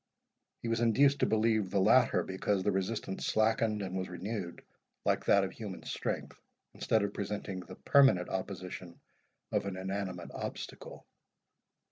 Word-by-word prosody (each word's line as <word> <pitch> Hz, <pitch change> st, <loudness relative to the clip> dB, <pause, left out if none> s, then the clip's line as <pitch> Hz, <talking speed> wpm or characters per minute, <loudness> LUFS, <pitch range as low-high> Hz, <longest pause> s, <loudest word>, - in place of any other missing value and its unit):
He -, -, -2 dB
was 115 Hz, 0 st, +1 dB
induced 135 Hz, +5 st, +4 dB
to -, -, +3 dB
believe 110 Hz, -2 st, +2 dB
the 100 Hz, +1 st, +1 dB
latter, 95 Hz, -, +4 dB
because 95 Hz, +1 st, -1 dB
the 105 Hz, -, +2 dB
resistance 95 Hz, 0 st, -2 dB
slackened 110 Hz, -1 st, +2 dB
and 95 Hz, -1 st, -4 dB
was 95 Hz, -1 st, -2 dB
renewed, 90 Hz, 0 st, -5 dB, 0.4 s
like -, -, +1 dB
that 100 Hz, -, +5 dB
of 95 Hz, -, -2 dB
human 105 Hz, -4 st, -7 dB
strength, -, -, -4 dB, 0.3 s
instead 110 Hz, -2 st, +1 dB
of 100 Hz, 0 st, -2 dB
presenting 100 Hz, -1 st, -4 dB
the 90 Hz, -, -10 dB
permanent 135 Hz, -11 st, +4 dB
opposition 90 Hz, -2 st, -5 dB, 0.5 s
of -, -, 0 dB
an 95 Hz, -2 st, -4 dB
inanimate 95 Hz, -2 st, -4 dB
obstacle. -, -, -7 dB
100 Hz, 145 wpm, -32 LUFS, 95-110 Hz, 0.5 s, that